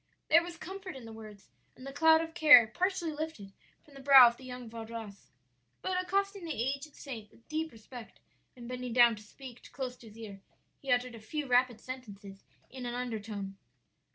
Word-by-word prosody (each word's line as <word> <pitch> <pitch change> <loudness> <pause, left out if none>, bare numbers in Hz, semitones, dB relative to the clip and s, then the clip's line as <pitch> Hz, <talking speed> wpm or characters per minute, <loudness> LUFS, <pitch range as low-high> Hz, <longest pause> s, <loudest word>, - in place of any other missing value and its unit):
"There 330 +2 +7
was 340 0 -8
comfort 380 -1 -8
in 260 -3 -10
the 225 - -10
words, 215 -2 -12 0.3
and 255 - -13
the 275 - -7
cloud 320 +2 +5
of 325 0 -6
care 295 -8 +8
partially 355 - -1
lifted 300 -11 -6 0.3
from 290 - -20
the 275 - -12
brow 270 -2 +9
of 235 - -1
the 260 - -16
young 250 -1 -8
Vaudois. 225 -2 -9 0.6
But 365 -1 0
accosting 395 +1 -1
the 325 -3 -4
aged 280 +4 -3
saint 225 -7 -8
with 230 - -24
deep 315 +1 -3
respect, 230 +1 -12 0.4
and 240 -2 -10
bending 250 -1 -5
down 240 -2 +6
to - - -11
speak 245 +3 -13
close 255 -2 -5
to 230 - -15
his 215 +1 -15
ear, 205 -4 -9 0.4
he 275 - -3
uttered 245 0 +1
a 230 - -10
few 295 +7 -4
rapid 250 -2 +2
sentences 205 -6 -10 0.2
in 255 -2 -7
an 240 - -4
undertone. 215 -5 -5
250 Hz, 195 wpm, -31 LUFS, 225-305 Hz, 0.6 s, brow